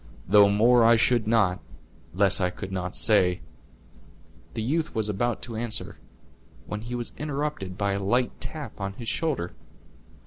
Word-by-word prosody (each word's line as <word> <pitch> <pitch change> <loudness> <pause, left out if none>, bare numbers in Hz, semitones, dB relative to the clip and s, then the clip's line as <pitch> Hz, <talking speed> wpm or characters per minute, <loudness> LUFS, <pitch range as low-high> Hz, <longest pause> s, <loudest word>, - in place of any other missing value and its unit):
"Though 100 +1 +6
more 115 +4 +4
I 115 +1 +6
should 115 -1 +2
not, 105 -5 +2 0.5
less 95 +1 +2
I 90 - +2
could 95 +1 -8
not 90 -1 -4
say," 90 -5 +3 1.1
the 110 - -2
youth 155 +6 -1
was 110 -1 0
about 110 +3 -1
to 120 -2 -5
answer, 115 0 -3 0.7
when 105 0 -5
he 120 +2 -5
was 120 -1 -4
interrupted 145 -10 -3
by 100 -1 0
a 100 - -2
light 120 +5 +1
tap 145 -10 -6
on 100 0 -3
his 115 +3 -9
shoulder. 140 - -2
110 Hz, 160 wpm, -26 LUFS, 95-120 Hz, 1.1 s, Though